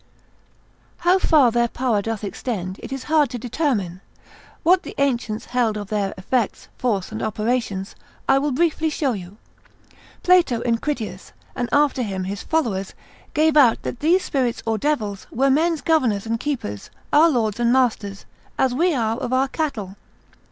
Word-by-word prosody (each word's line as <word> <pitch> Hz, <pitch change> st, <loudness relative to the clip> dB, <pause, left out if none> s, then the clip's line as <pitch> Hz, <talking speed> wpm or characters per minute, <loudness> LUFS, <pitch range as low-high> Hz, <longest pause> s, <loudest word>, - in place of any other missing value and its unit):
How 355 Hz, +2 st, +3 dB
far 290 Hz, -9 st, +4 dB
their 235 Hz, +1 st, +2 dB
power 235 Hz, -3 st, 0 dB
doth 225 Hz, 0 st, -4 dB
extend 195 Hz, -2 st, -4 dB
it -, -, -8 dB
is 270 Hz, -1 st, -4 dB
hard 305 Hz, -3 st, +3 dB
to 245 Hz, -, -5 dB
determine; 230 Hz, -, -2 dB, 0.6 s
what 360 Hz, +2 st, +5 dB
the -, -, -9 dB
ancients 240 Hz, -5 st, 0 dB
held 230 Hz, -4 st, +1 dB
of 205 Hz, -2 st, -6 dB
their 205 Hz, -2 st, -1 dB
effects, 220 Hz, +4 st, -2 dB
force 210 Hz, -7 st, -1 dB
and 220 Hz, -, -5 dB
operations, 215 Hz, -3 st, -2 dB, 0.3 s
I 270 Hz, 0 st, +5 dB
will 290 Hz, +2 st, 0 dB
briefly 320 Hz, +2 st, +1 dB
show 285 Hz, -4 st, 0 dB
you: 190 Hz, 0 st, -8 dB, 0.9 s
Plato 345 Hz, -10 st, +4 dB
in 230 Hz, -1 st, +1 dB
Critias, 220 Hz, -11 st, -4 dB, 0.2 s
and 245 Hz, -, -2 dB
after 290 Hz, -2 st, +3 dB
him 195 Hz, -5 st, -3 dB
his 195 Hz, +2 st, -4 dB
followers, 215 Hz, -12 st, -1 dB, 0.4 s
gave 310 Hz, 0 st, +3 dB
out 260 Hz, -7 st, +5 dB
that 235 Hz, -, -5 dB
these 345 Hz, +5 st, +3 dB
spirits 255 Hz, -4 st, -1 dB
or 225 Hz, -1 st, 0 dB
devils, 210 Hz, -8 st, -2 dB
were 270 Hz, +2 st, +2 dB
men's 320 Hz, +3 st, +2 dB
governors 250 Hz, -, +1 dB
and 230 Hz, 0 st, -1 dB
keepers, 230 Hz, -, -4 dB, 0.2 s
our 315 Hz, +3 st, +7 dB
lords 225 Hz, -6 st, 0 dB
and 235 Hz, 0 st, +3 dB
masters, 220 Hz, -6 st, 0 dB, 0.3 s
as 260 Hz, -2 st, +2 dB
we 335 Hz, +4 st, +2 dB
are 225 Hz, -2 st, 0 dB
of 240 Hz, -, -4 dB
our 260 Hz, +1 st, +2 dB
cattle. 215 Hz, -, -3 dB
245 Hz, 165 wpm, -22 LUFS, 210-290 Hz, 0.9 s, our